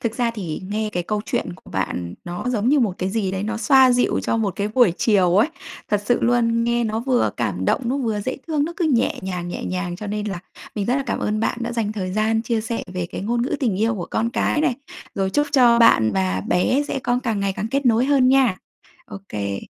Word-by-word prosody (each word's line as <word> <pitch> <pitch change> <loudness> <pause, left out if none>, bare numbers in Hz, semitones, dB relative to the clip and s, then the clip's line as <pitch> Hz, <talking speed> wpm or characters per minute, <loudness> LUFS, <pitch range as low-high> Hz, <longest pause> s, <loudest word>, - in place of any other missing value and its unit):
Thực 230 -1 -2
ra 240 -2 +1
thì 190 -8 -5
nghe 215 +1 -1
cái 175 - -1
câu 210 +4 -2
chuyện - - -2
của - - -16
bạn 90 -2 -3
nó 175 +4 -5
giống 230 -2 0
như 290 +2 +4
một 210 -7 +1
cái 185 +1 -1
gì 205 -3 -1
đấy 190 - -2
nó 220 +2 -2
xoa 260 +3 +5
dịu 245 0 +1
cho - - 0
một 205 -5 -1
cái 205 +1 -1
buổi 220 -4 +4
chiều 190 -5 +3
ấy. 225 +9 +4 0.4
Thật 210 -1 0
sự 245 - +3
luôn, 230 -1 +2
nghe 235 0 +1
nó 220 0 -1
vừa 250 0 +1
cảm 100 -6 -2
động, - - +2
nó 255 +4 0
vừa 225 -6 -1
dễ 260 +5 -3
thương, 300 -3 0
nó 335 - -4
cứ 355 - 0
nhẹ 250 -6 +1
nhàng, 180 -2 -4
nhẹ - - -5
nhàng. 180 -1 -3
Cho 210 - -7
nên 210 +1 -3
là 195 -4 -3 0.4
mình 205 -2 -2
rất 250 +3 +2
là 275 - 0
cảm - - -1
ơn 215 0 -1
bạn 235 - -1
đã 235 0 -3
dành 220 -3 -1
thời 185 -4 -4
gian 220 +2 +1
chia 230 -1 -1
sẻ 230 +1 -3
về 180 -2 -2
cái - - -7
ngôn 235 +4 -1
ngữ 255 - -1
tình 225 -8 +1
yêu 225 +1 +2
của 180 -5 -5
con 230 +1 0
cái 300 +4 0
này. 255 -6 +2 0.4
Rồi 195 -1 -1
chúc 290 +7 +1
cho 245 -4 +5
bạn 110 - +5
và 95 -1 0
bé 255 +10 +2
sẽ - - -2
có 245 -1 0
càng 225 -5 -1
ngày 200 -1 0
càng 210 +3 -4
kết 275 -1 0
nối 230 +1 +4
hơn 270 -2 +4
nha. 260 -7 +4 0.5
Ô - - -8
kê. 100 -2 -3
220 Hz, 260 wpm, -22 LUFS, 190-245 Hz, 0.5 s, xoa